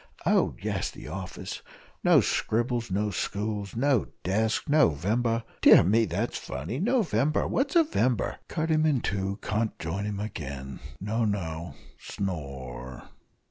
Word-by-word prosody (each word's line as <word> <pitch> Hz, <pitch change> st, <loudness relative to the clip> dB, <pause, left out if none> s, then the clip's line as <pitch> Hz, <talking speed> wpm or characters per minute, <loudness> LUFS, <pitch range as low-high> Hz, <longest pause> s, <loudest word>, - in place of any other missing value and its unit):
Oh, -, -, +3 dB
yes -, -, -2 dB
the -, -, -10 dB
office 95 Hz, +4 st, -6 dB, 0.4 s
no -, -, +6 dB
scribbles 120 Hz, +1 st, 0 dB
no 105 Hz, +2 st, 0 dB
stools, 100 Hz, +2 st, -3 dB
no 130 Hz, -1 st, +2 dB, 0.2 s
desks, 110 Hz, -, 0 dB
No 150 Hz, -, +5 dB
vember 115 Hz, +9 st, 0 dB, 0.2 s
dear -, -, +9 dB
me, 110 Hz, +6 st, +3 dB
that's 105 Hz, +6 st, -2 dB
funny! 80 Hz, -, -5 dB
No 240 Hz, +7 st, +3 dB
vember 155 Hz, -4 st, +1 dB
what's 275 Hz, +4 st, 0 dB
a 335 Hz, -, +7 dB
vember? 130 Hz, -, 0 dB
Cut 160 Hz, -1 st, -1 dB
him 155 Hz, 0 st, +3 dB
in 140 Hz, -6 st, +2 dB
two 95 Hz, 0 st, -2 dB
can't 110 Hz, +1 st, -1 dB
join 85 Hz, +5 st, -3 dB
him 105 Hz, -1 st, -3 dB
again 70 Hz, -10 st, -6 dB, 0.2 s
no 110 Hz, +4 st, -1 dB
no 85 Hz, -6 st, -2 dB, 0.2 s
snore!" 65 Hz, -, -5 dB
105 Hz, 140 wpm, -28 LUFS, 90-120 Hz, 0.4 s, dear